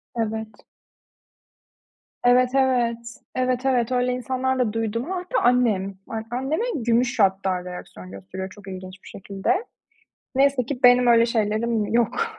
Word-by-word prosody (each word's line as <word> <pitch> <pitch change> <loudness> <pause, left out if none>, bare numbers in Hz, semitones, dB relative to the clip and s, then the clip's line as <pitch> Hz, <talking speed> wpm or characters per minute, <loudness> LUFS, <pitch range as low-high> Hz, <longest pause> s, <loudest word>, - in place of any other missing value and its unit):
Evet. 220 -1 -4 1.6
Evet, 250 +1 +5
evet. 250 -3 +2 0.4
Evet, 255 0 0
evet. 250 -2 +1
Öyle 250 0 +1
insanlar 260 +1 -1
da 225 -4 +1
duydum. 230 - -2
A, - - -1
hatta 360 0 -1
annem. 220 -6 +2
A 225 - -4 0.2
anneme 280 - -1
gümüş 240 -2 +1
hatta 190 -2 +1
reaksiyon 95 - -9
gösteriyor 100 - -7
çok 200 0 -15
ilginç 185 0 -9
bir - - -14
şekilde. 200 - -2 0.7
Neyse 270 -2 +2
ki 260 -1 -4
benim 245 0 +6
öyle 235 -1 +5
şeylerim 220 -1 0
yok. 335 - 0
235 Hz, 135 wpm, -23 LUFS, 205-255 Hz, 1.6 s, benim